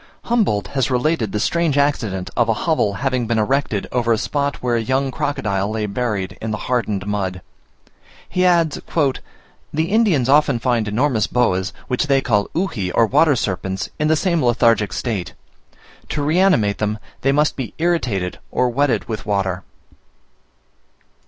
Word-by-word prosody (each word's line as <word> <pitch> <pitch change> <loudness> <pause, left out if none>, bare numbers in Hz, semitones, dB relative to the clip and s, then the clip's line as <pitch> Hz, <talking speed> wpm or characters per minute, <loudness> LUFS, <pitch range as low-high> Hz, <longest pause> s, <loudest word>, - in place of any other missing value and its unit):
Humboldt 210 - 0
has 135 -2 0
related 125 -3 0
the 105 - -1
strange 165 +4 +1
accident 115 -10 0
of 120 -2 +2
a 115 - +2
hovel 155 -11 +1
having 130 -1 -1
been 115 - 0
erected 110 -2 0
over 120 -2 +1
a 115 - +3
spot 140 +4 -1
where 125 -1 -1
a 115 - +1
young 130 +3 0
crocodile 105 -8 -1
lay 110 0 -2
buried 105 -3 -3
in 110 - -3
the 110 - -2
hardened 110 -6 -1
mud. 95 -3 -3 0.8
He 180 - 0
adds, 170 -4 +3 0.2
"The 150 +1 -3
Indians 200 - +3
often 145 -2 +4
find 115 -2 0
enormous 115 0 +1
boas, 95 -6 +1 0.2
which 125 +4 0
they 135 -1 +4
call 105 -6 +1
Uji 120 - -1
or 115 - +4
water 145 +5 +4
serpents, 95 -3 -3
in 150 - +1
the 160 - +4
same 170 -1 +1
lethargic 115 -4 +3
state. 105 -3 -3 0.7
To 145 - -2
reanimate 155 - +2
them, 105 0 -1 0.2
they 135 - +2
must 150 +2 +2
be 125 -6 -6
irritated 125 - -1
or 125 0 +1
wetted 140 +2 0
with 105 -4 -5
water." 95 -3 0
125 Hz, 160 wpm, -20 LUFS, 105-145 Hz, 0.8 s, often